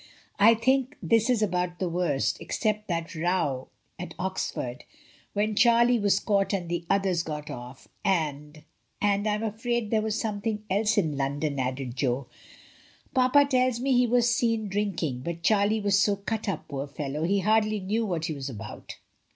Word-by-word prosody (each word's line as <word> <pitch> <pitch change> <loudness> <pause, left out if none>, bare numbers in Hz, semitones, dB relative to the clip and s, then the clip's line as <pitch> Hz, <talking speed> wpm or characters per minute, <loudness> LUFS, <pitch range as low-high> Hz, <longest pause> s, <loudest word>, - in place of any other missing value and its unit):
I 225 +3 +7
think 260 +4 +1
this 230 +1 +3
is 235 -4 +3
about 180 -3 -1
the 185 - -1
worst, 170 -5 0
except 215 -1 -1
that 170 -2 -3
row 165 -6 -1 0.3
at 180 - -7
Oxford, 175 -8 -3 0.5
when 210 +1 0
Charlie 235 +1 +5
was 200 -1 +3
caught 200 -2 +1
and 180 -4 -2
the 170 -1 -3
others 195 -3 +2
got 150 -3 -6
off; 125 +2 -9 0.2
and 150 -5 -1 0.2
— - - -46
and 205 0 +1
I'm 210 +1 0
afraid 225 +1 -2
there 220 -1 +3
was 220 0 -1
something 215 0 -2
else 210 +2 +2
in 160 -7 +1
London," 140 +1 -1
added 130 -1 -3
Jo. 130 0 0 0.9
"Papa 260 +3 +5
tells 255 -3 +1
me 270 +2 0
he 245 0 +4
was 240 0 +3
seen 230 -3 0
drinking, 185 -10 -1
but 170 +5 -5
Charlie 215 0 +3
was 200 -1 +3
so 200 0 +3
cut 215 +2 -3
up, 195 - -4
poor 140 -1 -4
fellow, 145 +1 -4
he 195 +4 +1
hardly 215 +1 +2
knew 210 +4 -1
what 175 -7 -2
he 165 - -2
was 140 -1 -5
about." 110 -3 -8
200 Hz, 175 wpm, -27 LUFS, 155-220 Hz, 0.9 s, I